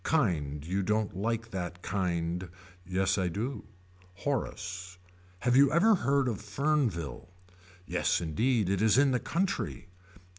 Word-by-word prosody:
Kind 75 Hz, -, 0 dB
you 95 Hz, +4 st, 0 dB
don't 105 Hz, 0 st, 0 dB
like 115 Hz, +3 st, -2 dB
that 90 Hz, -2 st, -5 dB
kind. 90 Hz, -2 st, -1 dB, 0.3 s
Yes 95 Hz, +2 st, +1 dB
I 95 Hz, -, +1 dB
do. 110 Hz, +10 st, -3 dB, 0.5 s
Horace. 90 Hz, -7 st, -3 dB, 0.4 s
Have 125 Hz, +2 st, +2 dB
you 140 Hz, +1 st, +6 dB
ever 185 Hz, +8 st, +5 dB
heard 140 Hz, -7 st, +2 dB
of 110 Hz, -5 st, -2 dB
Fernville. 110 Hz, -, -1 dB, 0.6 s
Yes -, -, +1 dB
indeed 105 Hz, -, +1 dB
it 95 Hz, +1 st, 0 dB
is 110 Hz, +1 st, +4 dB
in 140 Hz, 0 st, +5 dB
the 125 Hz, -, +2 dB
country. 185 Hz, -, -2 dB
100 Hz, 135 wpm, -30 LUFS, 90-130 Hz, 0.6 s, you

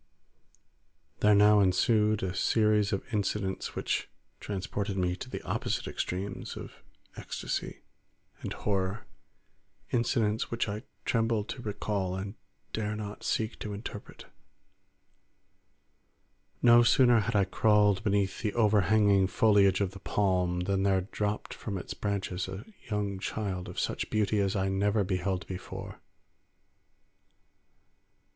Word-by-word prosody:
There 105 Hz, 0 st, +5 dB
now 105 Hz, +1 st, +6 dB
ensued 105 Hz, +3 st, +3 dB
a 95 Hz, -1 st, -1 dB
series 105 Hz, -1 st, +2 dB
of 100 Hz, -, -1 dB
incidents 100 Hz, -2 st, -2 dB
which -, -, -1 dB, 0.3 s
transported 100 Hz, 0 st, -3 dB
me 90 Hz, -1 st, +1 dB
to 130 Hz, -, -8 dB
the -, -, -6 dB
opposite -, -, -2 dB
extremes 95 Hz, +2 st, -4 dB
of -, -, -10 dB, 0.4 s
ecstasy -, -, -4 dB, 0.6 s
and -, -, -5 dB
horror; 100 Hz, +1 st, -2 dB, 0.9 s
incidents 115 Hz, -2 st, +1 dB
which 115 Hz, -1 st, -1 dB
I 105 Hz, +1 st, -4 dB, 0.2 s
tremble 115 Hz, -2 st, +1 dB
to 125 Hz, +4 st, -7 dB
recall 100 Hz, -3 st, -2 dB
and 95 Hz, +1 st, -5 dB, 0.4 s
dare 105 Hz, -1 st, -2 dB
not 105 Hz, -1 st, -6 dB
seek 110 Hz, 0 st, -1 dB
to 105 Hz, -, -5 dB
interpret. 105 Hz, 0 st, -8 dB, 2.4 s
No 120 Hz, 0 st, +8 dB
sooner 120 Hz, 0 st, +5 dB
had 115 Hz, +1 st, -1 dB
I 100 Hz, -, +5 dB
crawled 105 Hz, 0 st, +3 dB
beneath 100 Hz, -3 st, 0 dB
the 105 Hz, -2 st, -2 dB
overhanging 105 Hz, -2 st, +4 dB
foliage 100 Hz, -1 st, +4 dB
of 95 Hz, -2 st, 0 dB
the 100 Hz, -, -10 dB
palm, 90 Hz, -3 st, 0 dB
than 95 Hz, +1 st, 0 dB
there 95 Hz, -1 st, +3 dB
dropped 105 Hz, +2 st, -3 dB
from 100 Hz, -3 st, -5 dB
its 90 Hz, -, -6 dB
branches 95 Hz, -3 st, -2 dB
a 95 Hz, +4 st, -7 dB, 0.2 s
young 100 Hz, -2 st, -2 dB
child 95 Hz, -3 st, -3 dB
of -, -, -5 dB
such -, -, -2 dB
beauty 105 Hz, -1 st, +1 dB
as 100 Hz, 0 st, +1 dB
I 95 Hz, -1 st, +1 dB
never 100 Hz, +2 st, +1 dB
beheld 95 Hz, 0 st, -1 dB
before. 95 Hz, -1 st, -7 dB
100 Hz, 125 wpm, -29 LUFS, 95-105 Hz, 2.4 s, No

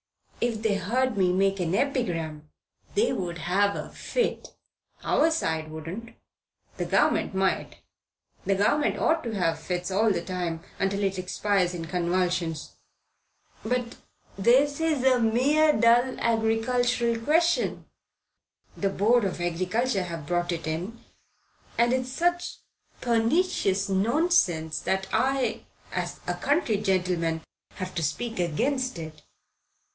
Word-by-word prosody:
"If 230 Hz, -2 st, -1 dB
they 220 Hz, -2 st, +2 dB
heard 240 Hz, +6 st, 0 dB
me 185 Hz, -2 st, +3 dB
make 195 Hz, +1 st, +1 dB
an 175 Hz, 0 st, 0 dB
epigram, 165 Hz, -, -1 dB, 0.5 s
they 435 Hz, +4 st, +2 dB
would 175 Hz, -3 st, -3 dB
have 195 Hz, +5 st, +1 dB
a -, -, -6 dB
fit." 485 Hz, -2 st, -2 dB, 0.5 s
"Our 315 Hz, +3 st, +3 dB
side 160 Hz, -, -1 dB
wouldn't. 165 Hz, +9 st, -7 dB, 0.6 s
The -, -, -2 dB
Government -, -, +2 dB
might. 190 Hz, 0 st, 0 dB, 0.7 s
The 195 Hz, -, +1 dB
Government 220 Hz, +10 st, +2 dB
ought 320 Hz, 0 st, +1 dB
to 230 Hz, -2 st, -4 dB
have 165 Hz, -4 st, 0 dB
fits 180 Hz, +2 st, -3 dB
all 215 Hz, +3 st, +3 dB
the 170 Hz, -3 st, -1 dB
time 175 Hz, -3 st, -3 dB, 0.2 s
until 200 Hz, +1 st, 0 dB
it 195 Hz, -1 st, 0 dB
expires 185 Hz, -1 st, 0 dB
in 165 Hz, -1 st, -5 dB
convulsions." 175 Hz, -2 st, -1 dB, 0.9 s
"But 245 Hz, +1 st, -2 dB, 0.4 s
this 260 Hz, +9 st, +3 dB
is 310 Hz, -5 st, +1 dB
a 260 Hz, -1 st, +4 dB
mere 270 Hz, +7 st, +4 dB
dull 240 Hz, +2 st, +4 dB
agricultural 235 Hz, +1 st, +1 dB
question. 330 Hz, +7 st, +1 dB, 0.9 s
The 200 Hz, -, 0 dB
Board 220 Hz, +5 st, +3 dB
of 190 Hz, -2 st, -2 dB
Agriculture 185 Hz, +5 st, 0 dB
have 165 Hz, -3 st, -6 dB
brought 175 Hz, +2 st, 0 dB
it 165 Hz, -2 st, -4 dB
in, 175 Hz, +9 st, -4 dB, 0.8 s
and 235 Hz, +1 st, +3 dB
it's 255 Hz, 0 st, -1 dB
such 350 Hz, +5 st, 0 dB, 0.4 s
pernicious 230 Hz, -, +1 dB
nonsense 195 Hz, -, +2 dB
that 190 Hz, 0 st, -1 dB
I, 255 Hz, 0 st, +1 dB, 0.3 s
as -, -, -3 dB
a -, -, -1 dB
county 285 Hz, -, +1 dB
gentleman, 180 Hz, -5 st, 0 dB, 0.3 s
have 185 Hz, -1 st, -5 dB
to 170 Hz, -, -2 dB
speak 225 Hz, -, -2 dB
against 255 Hz, -, 0 dB
it." 155 Hz, -2 st, -8 dB
200 Hz, 130 wpm, -26 LUFS, 180-250 Hz, 0.9 s, a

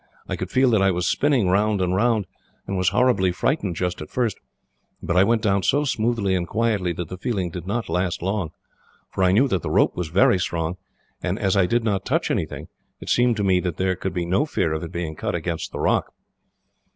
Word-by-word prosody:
I -, -, -2 dB
could -, -, -5 dB
feel 130 Hz, -1 st, +3 dB
that 110 Hz, -3 st, +3 dB
I 95 Hz, -, +4 dB
was 90 Hz, -1 st, 0 dB
spinning 135 Hz, -9 st, +2 dB
round 105 Hz, +2 st, +2 dB
and 90 Hz, 0 st, 0 dB
round, 110 Hz, 0 st, +2 dB, 0.4 s
and 100 Hz, -, -3 dB
was 90 Hz, -2 st, +2 dB
horribly 115 Hz, -6 st, +2 dB
frightened 100 Hz, -, -1 dB
just 90 Hz, -1 st, -2 dB
at 75 Hz, -, -7 dB
first. 120 Hz, -5 st, 0 dB, 0.6 s
But 85 Hz, -, -3 dB
I 90 Hz, -, +6 dB
went 115 Hz, +1 st, +1 dB
down 100 Hz, -2 st, +2 dB
so 145 Hz, +9 st, +2 dB
smoothly 115 Hz, -6 st, 0 dB
and 90 Hz, -2 st, -1 dB
quietly 105 Hz, -5 st, 0 dB
that 85 Hz, 0 st, -5 dB
the 90 Hz, +2 st, -8 dB
feeling 95 Hz, -6 st, -2 dB
did 90 Hz, +1 st, -7 dB
not 115 Hz, +3 st, -2 dB
last 90 Hz, +1 st, -1 dB
long; 95 Hz, -3 st, -1 dB, 0.6 s
for 95 Hz, -, -1 dB
I 90 Hz, -, +4 dB
knew 120 Hz, +9 st, +4 dB
that 95 Hz, -6 st, 0 dB
the -, -, -4 dB
rope -, -, +3 dB
was 90 Hz, -2 st, -3 dB
very 90 Hz, +3 st, +3 dB
strong, 85 Hz, 0 st, -2 dB, 0.4 s
and -, -, -2 dB
as 95 Hz, 0 st, +1 dB
I 95 Hz, -2 st, +3 dB
did 120 Hz, +2 st, +1 dB
not 100 Hz, -4 st, 0 dB
touch -, -, 0 dB
anything, -, -, -3 dB, 0.3 s
it -, -, -5 dB
seemed 120 Hz, -2 st, +3 dB
to 105 Hz, -, -1 dB
me 95 Hz, -2 st, +3 dB
that 90 Hz, -3 st, -3 dB
there 95 Hz, 0 st, +1 dB
could 95 Hz, 0 st, -4 dB
be 90 Hz, -1 st, -1 dB
no 90 Hz, +7 st, +2 dB
fear 85 Hz, -, 0 dB
of 80 Hz, -, -3 dB
it 85 Hz, -, -6 dB
being 85 Hz, -3 st, -4 dB
cut -, -, -3 dB
against 85 Hz, -1 st, -3 dB
the -, -, -6 dB
rock." -, -, +1 dB
95 Hz, 230 wpm, -23 LUFS, 90-110 Hz, 0.6 s, I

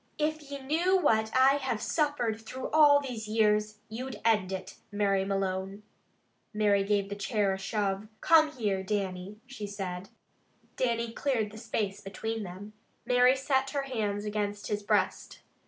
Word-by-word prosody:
If 310 Hz, +1 st, -1 dB
ye 280 Hz, -, -4 dB
knew 330 Hz, +8 st, +2 dB
what 220 Hz, -10 st, +2 dB
I 270 Hz, +2 st, +6 dB
have 265 Hz, -5 st, -2 dB
suffered 245 Hz, -5 st, 0 dB
through 255 Hz, +4 st, -6 dB
all 295 Hz, -2 st, +7 dB
these 240 Hz, -6 st, -5 dB
years, 215 Hz, -1 st, +2 dB
you'd 235 Hz, 0 st, -6 dB
end 210 Hz, -5 st, +3 dB
it, 190 Hz, 0 st, -6 dB
Mary 200 Hz, -2 st, +1 dB
Malone." 195 Hz, +1 st, -2 dB, 0.7 s
Mary 205 Hz, -2 st, +3 dB
gave 200 Hz, 0 st, +1 dB
the 200 Hz, -, -5 dB
chair 205 Hz, -1 st, 0 dB
a 190 Hz, -, -5 dB
shove. 200 Hz, 0 st, -2 dB
"Come 315 Hz, -2 st, +5 dB
here, 205 Hz, -6 st, -1 dB
Dannie," 190 Hz, 0 st, -3 dB
she 250 Hz, -6 st, -7 dB
said. 190 Hz, -2 st, -5 dB, 0.7 s
Dannie 235 Hz, -2 st, 0 dB
cleared 230 Hz, -6 st, -1 dB
the 215 Hz, -, -10 dB
space 210 Hz, -3 st, -3 dB
between 220 Hz, +3 st, -4 dB
them. 200 Hz, +2 st, -8 dB, 0.3 s
Mary 250 Hz, +1 st, +5 dB
set 270 Hz, 0 st, 0 dB
her 280 Hz, -1 st, -2 dB
hands 210 Hz, -6 st, -2 dB
against 205 Hz, -1 st, -3 dB
his 210 Hz, 0 st, -1 dB
breast. 205 Hz, -, -1 dB
215 Hz, 155 wpm, -29 LUFS, 200-260 Hz, 0.7 s, all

